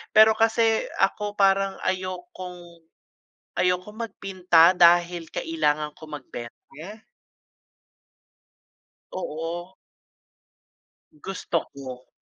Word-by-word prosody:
Pero 220 0 +8
kasi 225 0 +2 0.2
ako 205 -1 0
parang 195 0 +3
ayokong 180 -2 -6 0.7
ayokong 180 +3 0
magpinta 185 -3 +4
dahil 175 -1 +4
kailangan 150 - -1
ko - - -15
magbenta. 120 -4 -8 2.6
Oo. 175 +1 -5 1.4
Gusto 195 - -4
ko, 130 -2 -9
180 Hz, 70 wpm, -25 LUFS, 165-195 Hz, 2.6 s, Pero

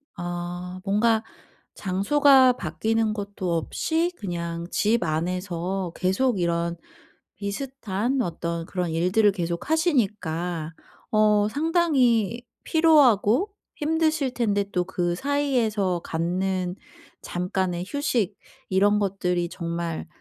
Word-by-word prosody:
아. 175 +1 -5
뭔가 220 +2 +2 0.5
장소가 260 +7 +4
바뀌는 220 +5 -1
것도 200 -4 -3
없이 320 - 0
그냥 170 -3 -4
집 220 -1 +2
안에서 180 +2 -2
계속 195 +4 +1
이런 170 0 0 0.6
비슷한 235 +2 -2
어떤 170 -4 -3
그런 180 -3 -3
일들을 185 +6 +3
계속하시니까 180 - -1 0.4
어 210 -1 +4
상당히 260 - +2 0.2
피로하고 310 - +4 0.2
힘드실 315 -3 0
텐데 205 -5 +1
또 180 -2 +1
그 175 -2 -1
사이에서 225 -9 0
갖는 180 +2 -1 0.5
잠깐의 180 0 -2
휴식 235 -7 0 0.3
이런 205 +2 +3
것들이 180 -3 -1
정말 170 -2 -4
195 Hz, 215 characters per minute, -25 LUFS, 175-245 Hz, 0.6 s, 장소가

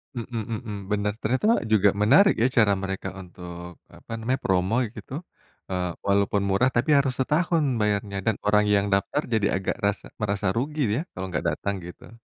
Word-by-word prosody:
Mhm 115 -1 -4
mhm, 110 -1 -5 0.2
bener 105 0 0
ternyata 130 - 0 0.3
juga 100 -1 +5
menarik 190 - +6
ya, - - +5
cara 105 -3 +5
mereka 95 0 -3
untuk 90 -1 -10 0.2
apa - - -16
namanya 125 +4 0
promo 95 +3 +2 0.2
gitu, - - -10 0.6
eee, 90 -1 -1 0.2
walaupun 100 0 +2
murah 110 +7 +3
tapi 120 +5 +1
harus 135 -2 +2
setahun 160 +4 +2 0.2
bayarnya 100 -1 0
dan 110 -2 +2
orang 105 0 +4
yang 100 -1 +3
daftar 100 +9 +1
jadi 105 -2 +2
agak 95 - -2
rasa 100 0 -1 0.2
merasa 100 -1 -1
rugi 150 +5 -2
dia 125 +8 0 0.2
kalau 95 - -3
gak 75 - -2
datang 100 0 -2
gitu. 90 +6 -11
105 Hz, 170 wpm, -25 LUFS, 95-120 Hz, 0.6 s, menarik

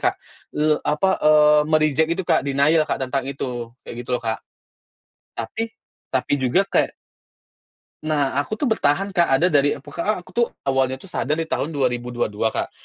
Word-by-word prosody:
Kak, - - -13 0.4
le 150 - +1 0.2
apa, 150 +6 +1
eee, 150 0 +6
me-reject 155 0 +3
itu 170 +3 -1
Kak, - - +3
denial 145 +3 +2
Kak, - - 0
tentang 130 +1 -2
itu, 125 -4 -4 0.2
kayak - - -8
gitu 125 - -8
loh 120 - -9
Kak. 110 0 -2 1.0
Tapi 170 - -3 0.4
tapi 130 +2 0
juga 130 +10 +3
kayak - - +1 1.2
Nah, 145 -3 +1
aku 145 +9 -1
tuh 245 +3 -1
bertahan 195 -1 +1
Kak. 175 -3 +3
Ada 155 +7 +3
dari 145 -2 +3
eee, 140 - -11
pu 145 - -12
ka 170 - -4
a 215 - +3
aku 180 - -17
tuh 235 +5 +2 0.2
awalnya 135 -1 +1
tuh 180 +8 -12
sadar 150 -2 -1
di 165 +1 -2
tahun 155 +1 -2
2022 120 -4 -1
Kak, - - -2
145 Hz, 180 wpm, -22 LUFS, 130-165 Hz, 1.2 s, eee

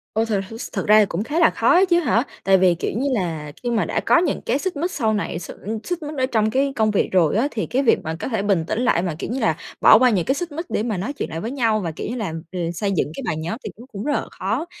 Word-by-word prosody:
Ôi, 220 +1 +2
thật 210 -4 0 0.2
s - - -6
thật - - -2
ra 215 +1 +7
thì 210 - +5
cũng 195 +2 -3
khá 300 +7 -2
là 330 - +6
khó - - 0
á 375 +2 +6
chứ 345 0 +5
hả? 245 -6 +2 0.2
Tại 195 0 +5
vì, 180 -2 +4
kiểu 170 - -3
như 275 +3 0
là, 165 -8 -2
khi 245 - -1
mà 230 -2 +1
đã - - -1
có - - +3
những 340 -3 0
cái 260 +5 0
xích 375 +1 -3
mích 345 +5 -1
sau 225 -9 0
này 205 -5 -2
x 175 - -8 0.3
xích 350 -3 -4
mích 295 0 -6
ở 260 - +2
trong 220 -4 +1
cái 275 +3 +1
công 220 -3 +2
việc 205 - +1
rồi 180 -2 +3
á, 265 +5 +2
thì 215 - -2
cái 265 +3 0
việc 235 - +4
mà 160 +1 -3
có - - -3
thể 225 -6 -1
bình 195 -5 +1
tĩnh - - -1
lại, 245 -8 +2
mà, 175 -4 -2
kiểu - - -4
như 250 +4 -2
là, 160 - +2 0.3
bỏ 220 - +8
qua 255 -1 +5
những 190 -6 +1
cái 270 - +1
xích 345 +2 -4
mích 325 +4 -5
để 215 - -1
mà 220 -5 -2
nói 215 +11 -3
chuyện 285 - -4
lại 160 - -4
với 225 - -4
nhau, 230 -5 +1
và 170 -5 -3
kiểu 155 - -6
như 240 - -3
là, 210 -9 -3 0.2
ờ, 185 - -5
xây 200 +3 -1
dựng 160 -5 0
cái 270 - -6
bài 155 - -1
nhóm 170 +8 -4
thì - - -3
nó 240 - -11
cũng 200 -1 -6
rất 290 - 0
là - - -1
khó. - - -2
220 Hz, 325 wpm, -22 LUFS, 190-270 Hz, 0.3 s, bỏ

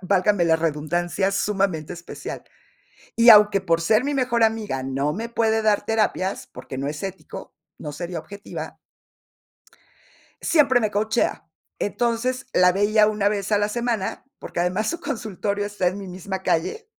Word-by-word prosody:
válgame 190 0 +2
la 160 -1 +4
redundancia, 165 +4 -1
sumamente 195 -5 -1
especial. 170 0 -8 0.7
Y 235 +1 +7
aunque 205 -2 +8
por 170 -3 +1
ser 215 +8 +3
mi 290 - -1
mejor 245 -4 +1
amiga 215 -12 0
no 135 +2 -1
me 230 +3 -4
puede 225 -1 +1
dar 210 -2 +2
terapias, 215 -3 -1
porque 130 - -9
no 140 +1 -2
es 150 +5 -5
ético, 190 -1 -8 0.2
no 150 - -6
sería 170 +2 -5
objetiva. 200 +6 -8 1.6
Siempre 270 -6 +4
me 215 -2 0
coachea. 220 -3 0 0.3
Entonces, 240 +4 -1
la 180 0 +5
veía 210 +2 +3
1 210 -1 +1
vez 205 0 -2
a 205 - +4
la 205 0 +1
semana, 235 -2 -2
porque 175 - -5
además 185 +5 0
su 340 - -5
consultorio 210 - -3
está 205 -3 -2
en 190 +3 -5
mi 195 -2 -8
misma 190 +1 -6
calle. 435 - -1
205 Hz, 155 wpm, -23 LUFS, 180-220 Hz, 1.6 s, aunque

